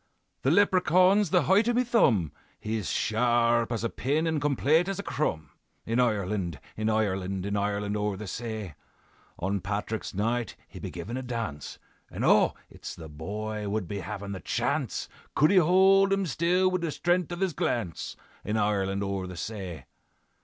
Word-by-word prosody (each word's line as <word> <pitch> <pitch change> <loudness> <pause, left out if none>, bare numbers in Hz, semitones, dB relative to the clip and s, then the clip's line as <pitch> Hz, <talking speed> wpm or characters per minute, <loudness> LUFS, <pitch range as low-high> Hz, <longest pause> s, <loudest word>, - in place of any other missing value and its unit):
"'The - - +2
Leprechaun's 185 0 +4
the - - +3
height 205 +6 +4
o' - - +2
me 250 +1 +3
thumb; 120 - +3 0.3
He's 110 -3 -3
sharp 120 +1 +2
as 115 -1 -2
a 115 - 0
pin 145 +5 0
and 160 -2 0
complate 150 +4 +2
as 195 -1 -2
a 200 - -4
crumb; 80 - -2 0.3
In 115 +2 0
Ireland, 100 - 0 0.2
in 110 0 -1
Ireland, 95 -3 0
In 100 0 -2
Ireland 100 0 -1
o'er 105 -1 -1
the 105 - -6
say, 110 -3 -5 0.6
On 95 +2 -1
Patrick's 105 +1 -3
Night 115 +2 -1
he - - -11
be - - -5
givin' 120 +4 -6
a - - -3
dance, 115 - -5 0.3
And - - -3
oh! - - +4
it's - - -9
the 80 -2 -10
boy 105 +7 -4
would 105 -3 -2
be 100 +4 -4
havin' 100 0 -6
the 95 - -5
chance - - -1 0.3
Could 150 +5 +5
he 200 - +4
hold 190 +3 +5
him 195 0 +2
still 175 +5 +2
wid 185 -1 -1
the 170 - -1
stren'th 175 +2 0
of 175 - -4
his 190 -3 +1
glance, 110 - -2 0.3
In 105 - -1
Ireland 100 -2 0
o'er 95 -1 -2
the 90 -1 -8
say. 90 - -6
110 Hz, 175 wpm, -28 LUFS, 100-160 Hz, 0.6 s, Could